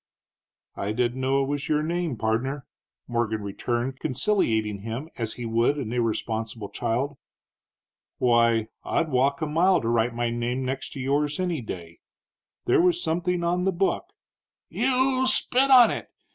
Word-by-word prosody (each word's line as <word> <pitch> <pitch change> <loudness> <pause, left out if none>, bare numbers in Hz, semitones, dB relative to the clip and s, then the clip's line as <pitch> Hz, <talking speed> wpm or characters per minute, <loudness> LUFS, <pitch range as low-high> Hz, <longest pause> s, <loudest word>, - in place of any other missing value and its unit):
"I 100 +2 -3
didn't 125 +2 -1
know 135 +1 +2
it - - -3
was 145 0 -3
your 150 0 +2
name, 170 -4 -2
pardner," 120 +6 -1 0.4
Morgan 110 -3 -1
returned, 120 +6 -3
conciliating 115 - +1
him 115 +9 -6
as 115 -2 -2
he 120 - -6
would 115 +5 +1
an 120 -5 -4
irresponsible 115 -2 -2
child. 125 +4 -2 1.0
"Why, 115 -2 +3
I'd 160 - 0
walk 140 +3 +1
a - - +1
mile 170 +5 +3
to 115 - -2
write 115 0 +1
my 120 0 -1
name 120 +2 -2
next 135 +1 -4
to - - -7
yours 145 +4 0
any 175 -6 -1
day. 85 -6 -8 0.7
There - - +4
was 175 -1 +3
something 175 +1 -1
on 175 +1 0
the 190 - +2
book 190 - 0 0.3
" - - -68
"You 260 +1 +2
spit 260 +1 +3
on 250 -3 +8
it! - - -5
130 Hz, 160 wpm, -25 LUFS, 115-165 Hz, 1.0 s, on